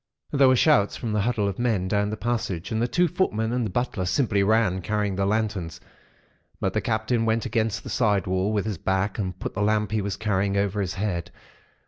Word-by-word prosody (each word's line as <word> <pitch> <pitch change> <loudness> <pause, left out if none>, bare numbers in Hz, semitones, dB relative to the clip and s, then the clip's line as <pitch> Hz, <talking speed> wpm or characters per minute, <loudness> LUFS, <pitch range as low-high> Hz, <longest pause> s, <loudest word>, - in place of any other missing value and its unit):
"There 140 -2 +5
were 130 - +5
shouts 125 -6 +3
from 115 -4 -3
the 105 - +1
huddle 110 -2 0
of 100 +1 -4
men 110 -7 +1
down 105 +1 +1
the 110 - -4
passage, 105 -7 -2
and 110 0 0
the 120 - +2
two 175 +7 +2
footmen 115 - 0
and 125 -1 0
the 110 - -2
butler 105 -2 -2
simply 105 0 +1
ran, 100 -2 +2
carrying 105 +1 -1
their 95 +1 0
lanterns, 105 -6 -1 0.8
but - - -1
the - - 0
Captain 115 +1 0
went 115 0 +1
against 115 -1 -1
the - - -7
side 105 -6 +2
wall 95 +2 0
with 105 -2 0
his 105 -6 -3
back 95 +2 -1
and 90 -3 -3
put - - -5
the 100 - -3
lamp 105 -1 +1
he 110 -1 +1
was 100 -1 -3
carrying 100 -2 0
over 100 +1 0
his 95 -1 -3
head. 95 -4 -2
105 Hz, 220 wpm, -25 LUFS, 95-115 Hz, 0.8 s, There